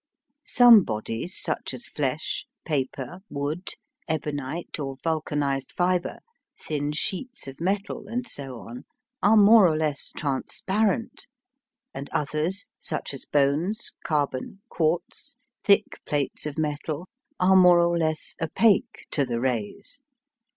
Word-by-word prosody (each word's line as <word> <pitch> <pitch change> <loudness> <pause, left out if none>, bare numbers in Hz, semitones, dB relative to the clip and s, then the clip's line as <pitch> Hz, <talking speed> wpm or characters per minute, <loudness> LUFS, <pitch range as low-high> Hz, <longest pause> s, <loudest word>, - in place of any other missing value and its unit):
Some 240 -3 +8
bodies, 115 - -4
such - - -2
as - - -8
flesh, - - -2 0.2
paper, 140 +2 -3
wood, 145 +5 -3 0.4
ebonite, 150 +1 -3
or 135 -2 -3
vulcanised 145 -4 -1
fibre, 180 0 0 0.4
thin 145 -1 -2
sheets 195 - -2
of 135 +3 -9
metal, 195 +4 -2
and 245 +3 -3
so 135 - -4
on, 120 +2 -9 0.4
are 215 +2 +5
more 210 -1 +8
or 155 -2 +1
less 155 -2 -1
transparent, 195 - -1 0.7
and 140 +1 -6
others, 155 +7 -1
such - - -2
as 135 - -5
bones, 150 +10 +1
carbon, 145 +5 -2
quartz, 170 - -1 0.3
thick 200 +1 +3
plates 145 0 -1
of 150 - -6
metal, 155 +2 -2 0.3
are 185 +1 +5
more 180 -2 +7
or 170 0 +3
less 155 -2 -1
opaque 195 +6 +2
to 145 - +2
the 120 -3 -2
rays. 125 - -3
155 Hz, 125 wpm, -26 LUFS, 140-190 Hz, 0.7 s, Some